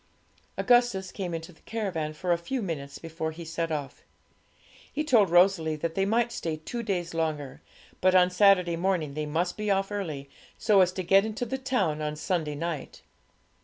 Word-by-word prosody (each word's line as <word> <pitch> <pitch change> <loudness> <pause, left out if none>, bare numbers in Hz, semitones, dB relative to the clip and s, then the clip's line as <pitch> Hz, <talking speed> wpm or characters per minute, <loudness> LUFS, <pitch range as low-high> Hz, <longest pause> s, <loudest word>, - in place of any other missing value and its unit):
Augustus 240 -7 +3
came 185 -3 -4
into 165 +1 -6
the - - -25
caravan 185 -9 -3
for 175 +4 -3
a 170 - +4
few 255 +10 -3
minutes 140 -6 -5
before 160 +1 -4
he 165 +1 -9
set 165 0 -3
off. 145 -3 -4 0.9
He 300 - -1
told 225 - +4
Rosalie 175 -3 +4
that 160 +2 -3
they 195 +2 +1
might 235 +3 +1
stay 160 -7 -3
two 235 +10 -5
days 180 -6 -2
longer; 155 -5 -3 0.4
but 185 0 +4
on 180 0 +5
Saturday 180 -2 +4
morning 170 -4 0
they 150 +1 -3
must 170 +4 -1
be 210 0 -2
off 195 0 +1
early, 155 -9 -4 0.3
so 205 -3 +4
as 180 -1 +4
to 185 - -3
get 195 +3 +5
into 220 +3 -3
the 265 +3 -3
town 250 - 0
on 150 0 -2
Sunday 155 -1 -2
night. 160 -2 -5
175 Hz, 185 wpm, -28 LUFS, 160-195 Hz, 0.9 s, on